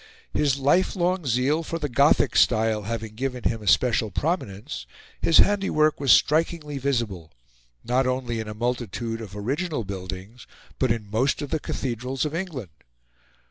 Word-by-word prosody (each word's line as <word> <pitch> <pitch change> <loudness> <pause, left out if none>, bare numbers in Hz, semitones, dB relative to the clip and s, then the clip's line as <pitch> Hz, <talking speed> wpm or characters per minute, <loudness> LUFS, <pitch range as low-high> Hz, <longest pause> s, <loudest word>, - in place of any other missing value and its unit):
His 140 -2 +2
lifelong 175 +3 +1
zeal 130 +6 +2
for 165 0 -4
the 150 -3 -2
Gothic 120 - +3
style 110 -1 +3
having 110 -2 -4
given 125 +1 -4
him 115 -2 0
a 105 - -9
special 115 0 +3
prominence, 100 - -3 0.3
his 165 - +4
handiwork 195 -7 +3
was 140 -2 +3
strikingly 150 -2 +2
visible, 115 - -2 0.5
not 125 +2 +1
only 125 -2 -1
in 110 - -4
a 105 - -6
multitude 115 -1 -3
of 105 -2 -9
original 140 - -2
buildings, 95 +3 -7 0.3
but 130 -3 +2
in 105 -3 -3
most 130 +6 +1
of 145 - -7
the 160 - +1
cathedrals 125 +1 -3
of 150 - -3
England. 160 - -5
125 Hz, 150 wpm, -25 LUFS, 110-150 Hz, 0.5 s, his